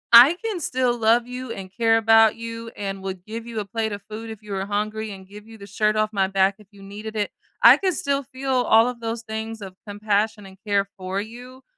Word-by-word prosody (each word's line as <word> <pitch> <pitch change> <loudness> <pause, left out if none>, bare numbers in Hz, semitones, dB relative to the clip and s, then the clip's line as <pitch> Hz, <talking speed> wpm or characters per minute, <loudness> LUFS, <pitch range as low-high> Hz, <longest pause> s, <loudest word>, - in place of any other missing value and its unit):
I 260 +8 +10
can 435 -5 -2
still 255 -5 0
love 230 +1 +3
you 250 -1 -6
and 190 -3 -7
care 225 -1 +3
about 225 -1 +5
you 230 0 -7
and 195 -1 -4
would 185 -2 -6
give 225 +2 -7
you 230 -2 -4
a 210 - -3
plate 220 +1 -2
of 205 0 -6
food 225 +1 -7
if 220 -1 -9
you 210 - -10
were 195 -1 -2
hungry 215 +1 -2
and 190 -1 -11
give 210 +2 -13
you 225 0 -12
the 200 - -11
shirt 210 +2 0
off 215 0 0
my 195 -2 +2
back 195 0 +2
if 210 - -18
you 200 -1 -15
needed 210 +2 -8
it, 210 -1 -1 0.3
I - - +10
can 380 -1 +1
still 280 -4 0
feel 265 +2 -5
all 245 -2 +4
of 245 -1 -4
those 230 0 -4
things 220 0 -5
of 190 -2 -8
compassion 210 +1 -1
and 190 0 -13
care 200 -1 +2
for 190 +1 -3
you, 245 +4 -11
220 Hz, 240 wpm, -23 LUFS, 200-230 Hz, 0.3 s, I